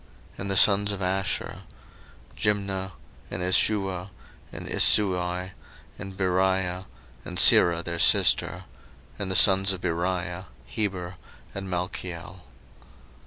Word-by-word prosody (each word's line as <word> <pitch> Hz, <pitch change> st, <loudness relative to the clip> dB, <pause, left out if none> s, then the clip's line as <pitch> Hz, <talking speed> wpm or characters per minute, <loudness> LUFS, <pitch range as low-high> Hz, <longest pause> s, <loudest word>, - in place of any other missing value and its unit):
01:046:017 -, -, -23 dB
And 100 Hz, -, -5 dB
the 95 Hz, -, -1 dB
sons 100 Hz, +1 st, +5 dB
of 100 Hz, -, -7 dB
Asher; 95 Hz, +1 st, -3 dB, 0.7 s
Jimnah, 100 Hz, -2 st, -2 dB, 0.4 s
and 90 Hz, -, -5 dB
Ishuah, 95 Hz, 0 st, 0 dB, 0.4 s
and -, -, -9 dB
Isui, 90 Hz, -2 st, +1 dB, 0.5 s
and 95 Hz, -1 st, -9 dB
Beriah, 95 Hz, -1 st, -1 dB, 0.4 s
and -, -, -8 dB
Serah 85 Hz, -1 st, +6 dB
their 85 Hz, 0 st, -5 dB
sister: -, -, +2 dB, 0.6 s
and 100 Hz, -2 st, -4 dB
the 95 Hz, -, -2 dB
sons 95 Hz, +1 st, +5 dB
of 95 Hz, -2 st, -6 dB
Beriah; 90 Hz, +1 st, -3 dB, 0.2 s
Heber, 95 Hz, -4 st, -4 dB, 0.4 s
and 95 Hz, -1 st, -7 dB
Malchiel. 90 Hz, -1 st, -6 dB
95 Hz, 115 wpm, -25 LUFS, 90-95 Hz, 0.7 s, Serah